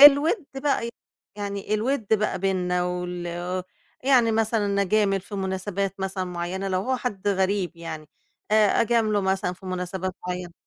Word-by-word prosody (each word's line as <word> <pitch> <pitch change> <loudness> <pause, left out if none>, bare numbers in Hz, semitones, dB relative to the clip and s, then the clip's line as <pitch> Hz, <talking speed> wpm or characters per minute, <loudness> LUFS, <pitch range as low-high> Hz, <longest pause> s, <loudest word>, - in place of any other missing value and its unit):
الوِد 290 +5 +8
بقى، 270 -4 0 0.5
يعني 200 0 -2
الوِد 230 +1 0
بقى 215 - 0
بيننا 180 -2 +1
وال 180 0 -3 0.4
يعني 245 -4 +5
مثلًا 215 -2 +2
أجامل 195 0 +2
في 200 - -10
مناسبات 195 0 -2
مثلًا 190 -1 -2
معيّنة 180 +2 -3
لو 185 0 +1
هو 260 +5 0
حد 205 -5 -2
غريب 190 -2 +1
يعني 160 -2 -7 0.4
آآ 215 -1 +5
أجامله 220 -2 +3
مثلًا 190 -1 0
في 185 +1 -12
مناسبات 185 0 -3
معيّنة. 180 -1 -4
195 Hz, 140 wpm, -25 LUFS, 180-215 Hz, 0.5 s, الوِد